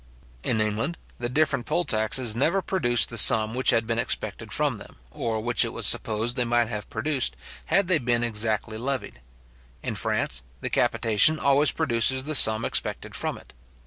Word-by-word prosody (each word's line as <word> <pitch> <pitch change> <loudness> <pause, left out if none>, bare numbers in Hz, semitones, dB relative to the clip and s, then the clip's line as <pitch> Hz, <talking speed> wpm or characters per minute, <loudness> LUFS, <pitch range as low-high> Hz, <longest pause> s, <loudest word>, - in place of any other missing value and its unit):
In 115 - -1
England, 110 +10 -1 0.2
the 120 0 -3
different 140 -2 0
poll 175 +3 -1
taxes 110 +1 0
never 170 +10 0
produced 120 - +1
the 115 - +1
sum 110 +1 +6
which 130 +1 +1
had 115 -3 +2
been 115 0 -2
expected - - -3
from - - -1
them, - - -14 0.2
or 110 - -3
which 120 +2 0
it - - -5
was - - -2
supposed 110 +3 0
they 125 - +2
might 120 -1 0
have 105 -3 -6
produced, 140 - -2 0.3
had 200 -2 +1
they 180 -3 +2
been 120 -2 0
exactly 110 -1 -2
levied. 130 - -5 0.6
In - - -3
France, 65 -2 -2 0.2
the - - -5
capitation 115 +8 +2
always 140 0 +3
produces 125 +3 +1
the 155 +2 -3
sum 110 -5 +6
expected - - -2
from - - -3
it. - - -17
120 Hz, 175 wpm, -24 LUFS, 110-140 Hz, 0.6 s, sum